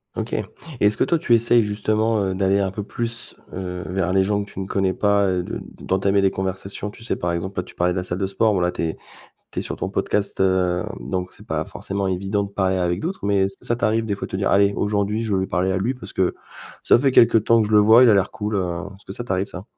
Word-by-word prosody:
OK. - - -4
Et - - -1 0.3
est-ce 105 +1 +3
que - - +3
toi 170 - +1
tu 120 -7 +3
essayes 120 0 +4
justement, 110 +2 0
heu, 95 -1 -1
d'aller 95 +1 +2
un 95 -1 0
peu 105 +2 -5
plus, 115 +2 -4 0.2
heu, 90 -1 -5
vers 90 -1 -1
les 95 0 +4
gens 100 +1 0
que 100 - -14
tu - - -8
ne 95 - -3
connais 95 -1 0
pas, 100 0 +2
heu, 90 -1 0
de - - -5 0.2
d'entamer 100 +1 +1
des 95 -1 +3
conversations? 95 +2 -4
Tu 110 +2 -13
sais 115 - -1
par 85 0 -2
exemple, 95 +3 -3
là, - - -1
tu - - -15
parlais 90 0 +1
de - - -4
la 90 - -1
salle 90 -1 -3
de 95 - -1
sport, 105 +3 +1
bon 95 - +1
là, 90 0 +1
tu - - -5
es 80 -1 -2 0.5
tu - - -6
es - - 0
sur - - -3
ton - - -4
podcast, 100 -1 -1
hem, 95 -2 +1
donc 90 -1 -4
c'est - - -15
pas - - -2
forcément 100 0 -4
évident 95 +2 -1
de 100 - -8
parler 95 -1 0
avec 90 -1 0
d'autres. 185 - -4
Mais 100 -1 +2
est-ce 95 0 -6
que - - -21
ça 120 - +1
t'arrive 115 -1 0
des 105 - -1
fois 100 - -5
de - - -17
te - - -2
dire: 100 +1 0
«Allez, 100 0 +4
aujourd'hui, 105 +1 0
je 110 -2 -2
veux 95 - +2
lui 95 - -2
parler 90 +3 0
à - - 0
lui, 110 +7 0
parce 125 - -10
que 95 -1 +1 0.5
ça - - +6
fait 135 0 +3
quelque 115 -2 +6
temps 115 +2 +3
que 110 - +1
je - - -4
le 105 - +7
vois 110 +4 +7
il - - +6
a - - +6
l'air 100 -1 +2
cool, 105 0 -4
heu», 100 - +2 0.4
est-ce 100 - -20
que 95 - -8
ça 120 - -5
t'arrive 95 -4 -1
ça? 90 +1 -8
100 Hz, 290 wpm, -22 LUFS, 95-105 Hz, 0.5 s, le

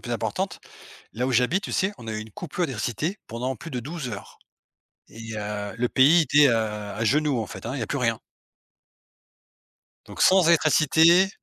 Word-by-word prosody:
plus - - -5
importante. - - -3 0.5
Là 125 +3 -2
où 130 - -1
j'habite, 125 - +2
tu - - -6
sais, 190 +2 +1
on 115 - -12
a 110 - -3
eu 110 - -4
une 110 0 -10
coupure 175 - -3
d'électricité 135 - -3
pendant 125 +3 -4
plus 165 - -10
de 125 -2 -4
12 150 +1 -6
heures 100 -3 -9 0.7
et, 115 0 -9
heu, 105 -1 -5
le 125 +1 0
pays 150 +8 +5
était, 145 0 +5
heu, 115 - +3
à 105 -1 -3
genoux, 145 +3 +1
en 110 - -3
fait, - - -10
hein, 120 - -4
il 140 - -4
y - - -3
a - - -3
plus 140 - -3
rien. 115 -3 0 1.9
Donc, - - -10
sans 185 -2 +5
électricité, 165 +3 +4
125 Hz, 195 wpm, -24 LUFS, 110-160 Hz, 1.9 s, pays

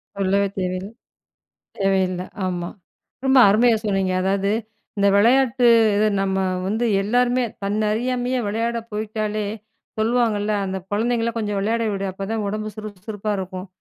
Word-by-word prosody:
சொல்லவே 200 +1 +1
தேவயில் 185 +1 -2 0.9
தேவையில்ல, 190 -2 +1 0.2
ஆமா. 175 -1 -3 0.6
ரொம்ப 265 0 +5
அருமையா 225 +3 +4
சொன்னிங்க. 195 -2 0
அதாவது, 195 +1 +1 0.5
இந்த 200 - +4
விளையாட்டு, 245 +3 +4 0.3
இது 215 +1 +3 0.2
நம்ம 190 -1 0 0.3
வந்து 220 +5 0 0.2
எல்லாருமே, 245 +4 +2 0.2
தன்ன 205 +2 -1
அறியாமையே 250 +2 -1
விளையாட 230 +2 -1
போயிட்டாலே! 215 0 -2 0.5
சொல்லுவாங்கள்ல, 220 -2 +1
"அந்த 190 0 -3
குழந்தைங்கள 230 +2 0
கொஞ்சம் 210 -2 -2
விளையாட 225 +3 0
விடு, 195 0 -3
அப்ப 195 - -8
தான் 225 -1 -1
ஒடம்பு 215 +1 -3
சுறுப்பு 210 -3 -8
சுறுப்பா 210 -1 -4
இருக்கும்." 185 0 -6
210 Hz, 130 wpm, -22 LUFS, 195-230 Hz, 0.9 s, ரொம்ப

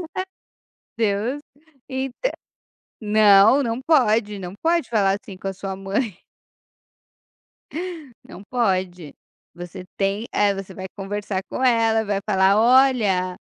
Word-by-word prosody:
A 375 - -2 0.7
Deus. 225 +6 -1 0.5
Então, 265 - -3 0.7
não, 215 +3 +5
não 235 0 -2
pode 225 -8 +2
não 180 -1 -7
pode 335 -3 +1
falar 200 -3 +1
assim 210 -6 -11
com 195 - -6
a - - -3
sua 190 0 -6
mãe. 195 +1 -3 2.1
Não 195 - -12
pode, 185 - -2 0.4
você 175 +1 -9
tem 200 +3 -1
eh, 205 -1 +2
você 195 -1 -8
vai 185 0 -7
conversar 200 -1 -3
com 260 - -3
ela, 225 -3 +3
vai 200 -2 -1
falar: 195 0 +3
"Olha, 225 -7 +3
205 Hz, 120 wpm, -22 LUFS, 195-240 Hz, 2.1 s, não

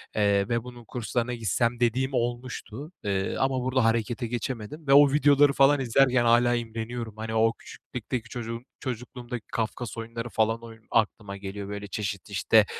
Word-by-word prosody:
eee, 100 -1 +2
ve 115 -1 0
bunun 120 -1 -11
kurslarına 120 +1 -2
gitsem 115 +1 0
dediğim 125 +3 +1
olmuştu. 120 +3 -3
Eee, 95 -1 -1
ama 135 -1 +1
burada 130 0 +2
harekete 115 +2 0
geçemedim 120 +4 -5
ve 135 - +5
o 145 -1 +8
videoları 145 -1 +5
falan 140 +1 +5
izlerken 130 0 +3
hâlâ 120 +1 +5
imreniyorum. 115 0 -4
Hani, 110 0 -4
o 115 +1 +4
küçüklükteki 120 0 -6
çocuk 115 -1 -5 0.2
çocukluğumdaki 125 -1 -6
Kafkas 115 0 -3
oyunları 115 +1 -5
falan 115 +1 +1 0.3
aklıma 105 -3 0
geliyor. 100 0 -6
Böyle 100 0 -5
çeşit, 100 -2 -4
işte, - - +4
120 Hz, 150 wpm, -27 LUFS, 110-125 Hz, 0.3 s, o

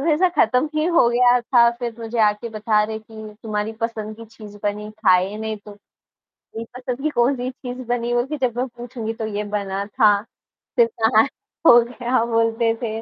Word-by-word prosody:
वैसा 320 +5 +3
ख़त्म 255 +4 +3
ही 310 - +1
हो 330 -8 +5
गया 245 +1 +4
था, 240 0 +4
फिर 235 -1 -5
मुझे 230 0 -5
आके 210 +2 +1
बता 215 -1 +1
रहे 220 +1 -3
कि 220 -1 -11
तुम्हारी 215 0 -2
पसंद 220 -2 -4
की 230 - -10
चीज़ 215 -2 -13
बनी 210 0 -3
ख़ाई 195 -2 +2
नहीं 220 0 -4
तुम, 205 0 -13 0.8
मेरी 225 - -4
पसंद 250 +1 -5
की 310 - +1
कौन-सी 250 0 +1
चीज़ 255 -1 -8
बनी 240 0 -1
होगी? 245 +5 0
जब 245 -2 -1
मैं 255 - 0
पूछूँगी 240 -2 -6
तो 225 -1 -4
ये 210 - -2
बना 200 -1 -2
था। 210 -3 +3 0.6
फिर 235 -3 +5
कहाँ 220 0 +5
ख़ो 240 -4 +3
गया 245 0 -1
बोलते 230 0 +1
थे, 225 -1 -3
230 Hz, 185 wpm, -21 LUFS, 215-245 Hz, 0.8 s, हो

